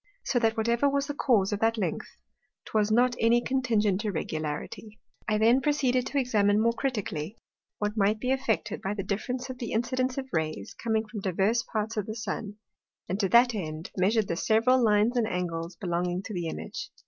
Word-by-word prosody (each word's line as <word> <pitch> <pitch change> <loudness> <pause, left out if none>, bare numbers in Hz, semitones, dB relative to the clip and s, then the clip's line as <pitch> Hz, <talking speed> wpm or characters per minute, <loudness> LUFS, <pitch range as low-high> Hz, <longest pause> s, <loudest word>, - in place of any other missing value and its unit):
So 245 - +1
that 225 -1 +1
whatever 235 +5 +2
was 280 0 0
the 290 - -4
cause 220 -8 +2
of 205 - -2
that 225 +1 +2
length, 200 - -3 0.5
'twas 215 -1 +1
not 245 +2 +3
any 230 +1 +4
contingent 225 -6 +1
Irregularity. 160 +3 -4 0.3
I 215 -1 +2
then 230 +5 +4
proceeded 265 -4 +1
to 285 - -3
examine 210 -6 +3
more 230 +1 +3
critically, 210 - -3 0.4
what 210 0 -2
might 210 0 +2
be 250 +3 -1
effected 235 -6 -1
by 195 +2 -2
the 195 - -3
difference 245 +6 -3
of 255 - -10
the 235 - -4
incidence 255 +3 0
of 265 -1 -3
Rays 155 -11 -2
coming 220 -1 -1
from 210 0 -6
divers 195 +5 +1
parts 220 0 -2
of 210 - -1
the 215 - -4
Sun; 210 -1 -4 0.5
and 190 +3 -2
to 195 -3 +1
that 240 +4 +6
end, 160 -4 -5
measur'd 200 +3 +2
the 170 - -1
several 235 +7 +3
Lines 215 +2 +3
and 230 -2 +2
Angles 170 -3 -3
belonging 175 0 -2
to 215 - -7
the 175 -3 -2
Image. - - -6
220 Hz, 190 wpm, -28 LUFS, 195-240 Hz, 0.5 s, that